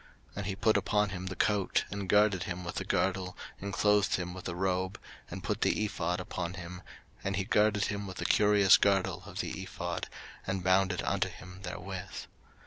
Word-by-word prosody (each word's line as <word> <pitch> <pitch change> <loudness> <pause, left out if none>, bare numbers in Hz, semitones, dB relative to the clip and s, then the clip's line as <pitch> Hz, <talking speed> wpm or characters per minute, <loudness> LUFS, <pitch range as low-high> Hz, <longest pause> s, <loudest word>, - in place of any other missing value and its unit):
03:008:007 - - -18
And 100 - -2
he 100 - -2
put 110 +2 +3
upon 105 -1 +2
him 95 -1 -5
the 95 - -4
coat, 100 -1 +2
and 100 -2 -4
girded 105 -3 +4
him 90 -1 -4
with 85 - -4
the - - -1
girdle, 90 -1 0 0.2
and 100 +1 -4
clothed 105 0 +3
him 90 -1 -3
with 90 - -9
the 85 - -3
robe, 95 0 -1 0.3
and 90 +1 -6
put 105 +3 -2
the 110 - +2
ephod 90 -3 -1
upon 90 -1 -4
him, 90 -1 -7 0.4
and 95 0 -1
he 95 - 0
girded 105 0 +3
him 100 -1 -3
with 95 - -7
the - - -3
curious 105 -2 +6
girdle 100 -2 +2
of - - -3
the - - -4
ephod, - - -4 0.4
and 95 -1 -1
bound 95 +1 +4
it 90 - -2
unto - - +1
him 95 +1 -11
therewith. 95 0 -6
95 Hz, 205 wpm, -31 LUFS, 90-100 Hz, 0.4 s, curious